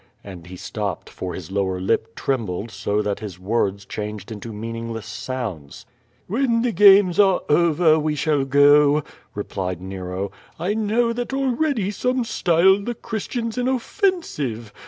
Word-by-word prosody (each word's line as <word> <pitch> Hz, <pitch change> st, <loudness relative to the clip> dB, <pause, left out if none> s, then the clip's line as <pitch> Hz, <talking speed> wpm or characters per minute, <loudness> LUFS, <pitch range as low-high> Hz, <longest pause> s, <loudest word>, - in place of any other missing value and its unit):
And 90 Hz, -4 st, -10 dB
he 90 Hz, -, -9 dB
stopped, 100 Hz, 0 st, -5 dB
for 90 Hz, -1 st, -5 dB
his 90 Hz, -1 st, -8 dB
lower 95 Hz, -2 st, -1 dB
lip 110 Hz, +4 st, -1 dB
trembled 115 Hz, -5 st, -2 dB
so 105 Hz, +1 st, -1 dB
that 100 Hz, -1 st, -2 dB
his 100 Hz, -5 st, -7 dB
words 100 Hz, 0 st, -1 dB
changed 105 Hz, 0 st, -6 dB
into 110 Hz, +1 st, -7 dB
meaningless 115 Hz, +1 st, -5 dB
sounds. 105 Hz, -, -6 dB, 0.4 s
When 230 Hz, +2 st, +1 dB
the 245 Hz, -, +1 dB
games 195 Hz, -2 st, +6 dB
are 195 Hz, -3 st, +5 dB
over 160 Hz, 0 st, +4 dB
we 150 Hz, 0 st, -1 dB
shall 150 Hz, -2 st, +1 dB
go,'' 145 Hz, +2 st, +5 dB, 0.3 s
replied 95 Hz, -3 st, -4 dB
Nero. 95 Hz, +1 st, -5 dB, 0.3 s
"I 180 Hz, +5 st, -1 dB
know 220 Hz, +2 st, +1 dB
that 245 Hz, +3 st, -3 dB
already 265 Hz, -5 st, 0 dB
some 250 Hz, +4 st, 0 dB
style 190 Hz, -2 st, +3 dB
the 240 Hz, +4 st, -4 dB
Christians 230 Hz, +1 st, -4 dB
inoffensive. 245 Hz, -, -1 dB
140 Hz, 140 wpm, -22 LUFS, -, 0.4 s, games